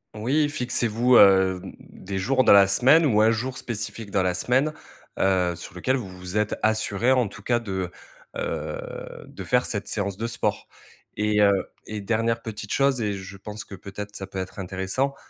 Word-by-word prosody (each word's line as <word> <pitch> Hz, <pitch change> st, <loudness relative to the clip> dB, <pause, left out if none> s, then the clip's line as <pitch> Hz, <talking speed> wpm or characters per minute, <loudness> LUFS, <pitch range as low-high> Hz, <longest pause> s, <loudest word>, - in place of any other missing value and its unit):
Oui, 135 Hz, +8 st, +1 dB
fixez-vous, 125 Hz, -2 st, +1 dB
heu, 95 Hz, -2 st, +6 dB
mmh -, -, -8 dB, 0.2 s
des 95 Hz, 0 st, -6 dB
jours 130 Hz, +7 st, +2 dB
dans -, -, +5 dB
la 100 Hz, -1 st, +7 dB
semaine 130 Hz, +11 st, +5 dB
ou 110 Hz, -7 st, +3 dB
un 110 Hz, +1 st, +5 dB
jour 125 Hz, +4 st, -3 dB
spécifique 110 Hz, -2 st, -5 dB
dans 95 Hz, -, +2 dB
la 90 Hz, -1 st, +1 dB
semaine. 130 Hz, +10 st, +1 dB, 0.5 s
Heu, 90 Hz, -2 st, +2 dB
sur 85 Hz, -, -10 dB
lequel 95 Hz, +9 st, 0 dB
vous 120 Hz, -7 st, -4 dB
vous 90 Hz, +2 st, -6 dB
êtes 105 Hz, 0 st, 0 dB
assuré, 110 Hz, +2 st, +1 dB
en 125 Hz, -3 st, +3 dB
tout 100 Hz, -, -11 dB
cas 120 Hz, -1 st, +1 dB
de, 95 Hz, -5 st, -4 dB, 0.5 s
heu, -, -, -3 dB, 0.5 s
de -, -, -9 dB
faire 125 Hz, 0 st, +2 dB
cette 100 Hz, -3 st, -2 dB
séance 100 Hz, -2 st, -2 dB
de 115 Hz, -, -2 dB
sport 115 Hz, -, -2 dB, 0.5 s
et 105 Hz, 0 st, +2 dB
heu 100 Hz, -1 st, +3 dB, 0.2 s
et 110 Hz, -1 st, -5 dB
dernière 115 Hz, +2 st, 0 dB
petite 105 Hz, -2 st, -7 dB
chose 135 Hz, -3 st, +2 dB
et 105 Hz, -2 st, -1 dB
je 100 Hz, 0 st, -8 dB
pense 105 Hz, +2 st, -7 dB
que -, -, -12 dB
peut-être 100 Hz, +2 st, -8 dB
ça 95 Hz, -, -6 dB
peut 95 Hz, -, -9 dB
être 95 Hz, +2 st, -6 dB
intéressant, 95 Hz, +9 st, -2 dB
105 Hz, 190 wpm, -24 LUFS, 95-120 Hz, 0.5 s, la